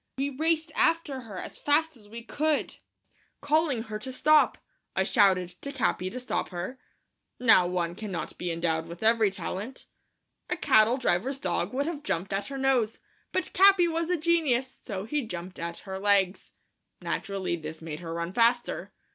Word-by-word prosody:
We 275 +1 -1
raced 315 +3 0
after 325 -5 +1
her 215 -6 -9
as - - -6
fast 315 +2 +2
as 210 -4 -17
we 230 +2 -8
could, 300 +4 -1 0.6
calling 290 -5 +1
to 225 - -17
her 215 0 -4
to 260 +4 -6
stop. 305 +4 +4 0.4
I - - +2
shouted 185 -3 +3
to 280 - -5
Capi 220 -8 0
to 250 - -6
stop 250 - -2
her. 185 +9 -5 0.6
Now 220 -7 +6
one 175 -1 -1
cannot 195 -2 -5
be 180 - -2
endowed 165 -1 -1
with 170 +4 -9
every 225 -1 +4
talent. 200 +6 -6 0.6
A - - -1
cattle 220 +3 +4
driver's 255 +2 0
dog 180 -3 -2
would 280 +2 0
have 320 -2 -4
jumped 195 - -2
at 195 +1 -1
her 275 - -5
nose, 260 -5 +1 0.3
but 370 - -2
Capi 385 -2 +6
was 330 0 -1
a 360 - +2
genius, 310 -6 +2
so 195 -5 -6
he 295 +8 -1
jumped 180 -5 -7
at 170 0 -4
her 190 -1 -5
legs. 200 -2 +2 0.5
Naturally, 195 -3 -2
this 155 -1 -7
made 160 -2 -6
her 165 -1 -6
run 170 +2 -3
faster. 240 +2 +1
225 Hz, 175 wpm, -28 LUFS, 185-280 Hz, 0.6 s, Now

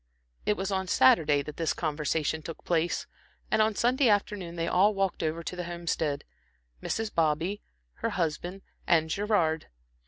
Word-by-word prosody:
It 210 - +2
was 190 +1 -2
on 190 -1 -1
Saturday 145 -1 +4
that 150 - -8
this 165 -1 0
conversation 155 0 -1
took 165 +1 -8
place; 170 0 0 0.5
and 215 - +4
on 215 0 +2
Sunday 250 +2 +3
afternoon 200 -4 0
they 165 0 -1
all 200 +4 +4
walked 195 -2 0
over 165 +1 -2
to 180 - -5
the 180 -1 -4
Homestead 165 -4 -2 0.6
Mrs. 220 -1 -2
Bobby, 165 +5 +1 0.4
her - - -1
husband 175 +3 -2 0.2
and 160 -2 +3
Gerard. 185 -6 +1
170 Hz, 155 wpm, -28 LUFS, 160-195 Hz, 0.6 s, Saturday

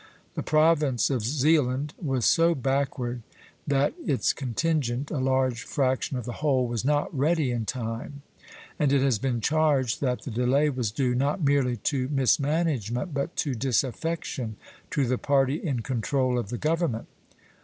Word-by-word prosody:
The - - -3
province 155 -5 +2
of 130 -4 0
Zealand 140 +2 +1
was 135 -7 0
so 170 0 +4
backward 135 -2 -1 0.5
that 140 0 +2
its 140 -4 +1
contingent, 135 0 -1
a 145 - -1
large 130 -2 +1
fraction 130 +1 -1
of 125 - -5
the 120 - -4
whole, 135 -4 +2
was 120 -2 -3
not 145 +3 0
ready 150 0 +1
in 115 -2 -2
time; 120 +4 -5 0.6
and 145 -2 +2
it 140 -1 +3
has 130 -6 +2
been 120 -1 -1
charged 145 -4 +1
that 125 -3 -1
the 130 - -6
delay 130 +6 +2
was 125 -5 -1
due, 125 +3 0
not 140 +7 0
merely 140 -4 +2
to 130 +2 -1
mismanagement, 140 - 0
but 140 +4 -2
to 145 -5 -1
disaffection 130 0 -2 0.3
to 140 - +1
the 125 0 0
party 140 +1 +1
in 135 -9 -1
control 125 +1 0
of 100 - -5
the 120 - -3
government. 155 -6 -1
135 Hz, 155 wpm, -26 LUFS, 125-145 Hz, 0.6 s, so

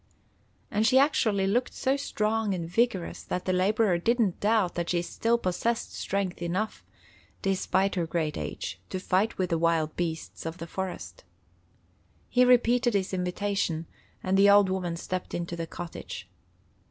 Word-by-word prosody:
And 215 +2 +2
she 260 - +5
actually 225 -8 +3
looked 235 +6 0
so 265 +1 +1
strong 220 -6 0
and 170 -2 -4
vigorous 200 -1 0
that 180 - -4
the 185 - +1
laborer 190 0 +2
didn't 230 -1 +1
doubt 210 -3 +2
that 170 -1 -3
she 175 -1 +1
still 230 +6 +1
possessed 230 +4 -1
strength 195 -3 -2
enough, 185 +6 -2 0.6
despite 195 0 +1
her 175 -3 -1
great 160 -2 -1
age, - - -5
to 185 - -3
fight 190 +4 +1
with 185 -2 -1
the 165 - +2
wild 165 -2 +1
beasts 165 -2 -4
of 165 +1 -5
the 165 - -6
forest. 190 - -6 1.1
He 250 - +4
repeated 245 -1 +4
his 190 -1 0
invitation, 180 -2 -1 0.4
and 190 +1 +2
the 200 +1 +7
old 200 -1 +6
woman 180 -3 -2
stepped 185 +2 -4
into 170 0 -3
the 165 -1 -4
cottage. 165 - -7
190 Hz, 155 wpm, -28 LUFS, 175-220 Hz, 1.1 s, the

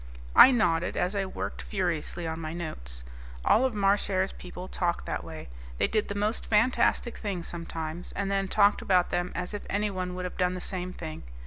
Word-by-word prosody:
I - - +11
nodded 180 -9 +2
as 180 +2 +1
I 195 -1 0
worked - - -5
furiously 175 -3 -2
on 160 0 -3
my 160 -1 -4
notes. - - -6 0.4
All 250 - +5
of 255 -4 -1
Marchare's 195 -1 +2
people 180 0 -8
talked 175 -2 -1
that - - -3
way. - - -8 0.3
They - - +3
did 215 -1 0
the 200 - -4
most 210 +3 0
fantastic 235 +2 +2
things 190 -6 -3
sometimes, 165 0 -5
and 195 0 -1
then 195 0 +1
talked 205 +1 +4
about 180 -2 +3
them 175 0 0
as 180 +3 -3
if 205 - -4
anyone 190 -3 -1
would 180 0 -4
have 180 - -6
done 180 0 +1
the - - -4
same 185 0 -4
thing. 160 -3 -7
185 Hz, 195 wpm, -28 LUFS, 175-200 Hz, 0.4 s, I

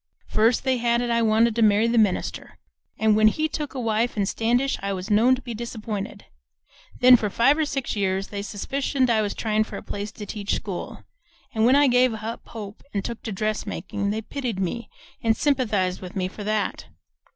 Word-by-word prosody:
First 225 +2 +2
they 260 -1 +1
had 235 0 +2
it 240 - -1
I 235 0 +2
wanted 225 0 +3
to 230 - +1
marry 215 +1 +4
the 235 0 +3
minister, 205 -4 -1 0.4
and 220 -1 +3
when 215 0 +5
he 310 +8 +1
took 300 -2 -5
a - - -3
wife 230 0 0
in 200 - +2
Standish 245 +6 0
I 200 0 -2
was 190 +3 -5
known 235 +5 +5
to 255 - -11
be 240 - -5
disappointed. 215 -3 -5 0.8
Then 250 0 +9
for 215 -3 0
five 245 +8 +4
or 315 0 +1
six 275 -5 -3
years 195 -1 -1
they 200 -1 -4
suspicioned 255 +5 -1
I 220 -1 +3
was 205 -1 -2
tryin' 215 -1 +1
for - - -8
a - - -8
place 205 +1 -5
to 210 - -8
teach 200 0 -2
school, 190 -4 -6 0.5
and 220 0 +3
when 260 - +5
I 290 +1 +6
gave 250 -2 +3
up 220 +1 -6
hope, 210 -3 -8
an' 200 - 0
took 235 -1 -5
to 220 - -5
dressmakin', 200 -1 -3
they 220 +2 -2
pitied 245 -5 -4
me 210 +5 -3 0.3
and 225 -1 +2
sympathized 215 -10 +1
with 185 -1 -9
me 185 -2 0
for 205 +2 -8
that. 215 -1 -1
220 Hz, 205 wpm, -24 LUFS, 205-240 Hz, 0.8 s, Then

